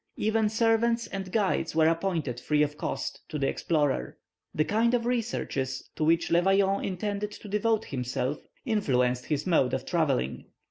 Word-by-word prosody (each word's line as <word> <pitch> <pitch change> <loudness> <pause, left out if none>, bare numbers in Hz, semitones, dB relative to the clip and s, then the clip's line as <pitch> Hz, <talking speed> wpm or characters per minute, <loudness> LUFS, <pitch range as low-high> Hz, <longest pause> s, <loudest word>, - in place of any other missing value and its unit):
Even 220 0 +1
servants 230 +1 +2
and 195 -2 -6
guides 190 -7 0
were 160 -1 +5
appointed, 165 -7 -1
free 150 +3 +2
of 150 0 -2
cost, - - -4
to 155 - -3
the 135 -2 0
explorer. 145 -4 0 0.4
The 155 - +2
kind 230 +5 +2
of 235 -1 -1
researches 210 - -2
to - - -1
which 165 +2 +2
Le 170 +1 +5
Vaillant 195 +1 +2
intended 205 +2 -2
to 210 - -10
devote 215 +2 +1
himself 130 +1 -2 0.3
influenced 125 - +1
his 150 -1 -1
mode 160 -9 +2
of - - -5
travelling. 65 +2 0
175 Hz, 165 wpm, -28 LUFS, 145-215 Hz, 0.4 s, were